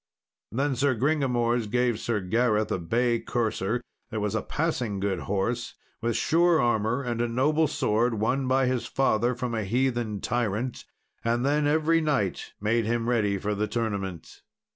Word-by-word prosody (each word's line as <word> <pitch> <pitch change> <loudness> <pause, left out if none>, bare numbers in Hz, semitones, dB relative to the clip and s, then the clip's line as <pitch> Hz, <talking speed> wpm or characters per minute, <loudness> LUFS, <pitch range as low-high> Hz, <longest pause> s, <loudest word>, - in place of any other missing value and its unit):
Then 135 +5 0
Sir 130 +1 +2
Gringamors 120 -4 +1
gave 120 -1 +1
Sir 115 -3 -1
Gareth 110 +2 +1
a - - 0
bay 115 +7 +1
courser 115 -1 -1 0.3
that 110 - -3
was 105 0 -1
a 110 - 0
passing 125 -10 -2
good 95 -2 -1
horse, 110 +6 -2 0.3
with 115 -1 0
sure 170 0 +3
armour, 120 +2 +1
and 120 -2 -2
a 120 - +1
noble 150 +7 +2
sword, 115 -4 +1
won 130 +5 0
by 130 +1 +3
his 125 -1 -1
father 120 -2 +1
from 120 0 -3
a 110 -1 -1
heathen 120 -1 0
tyrant. 120 +1 -2 0.4
And 120 +2 +1
then 145 +1 +2
every 160 +2 +3
knight 140 - -1
made 110 +2 +1
him 115 +1 0
ready 105 -5 +1
for 105 +2 -2
the 105 +1 -1
tournament. 100 -6 -4
120 Hz, 165 wpm, -27 LUFS, 105-130 Hz, 0.4 s, sure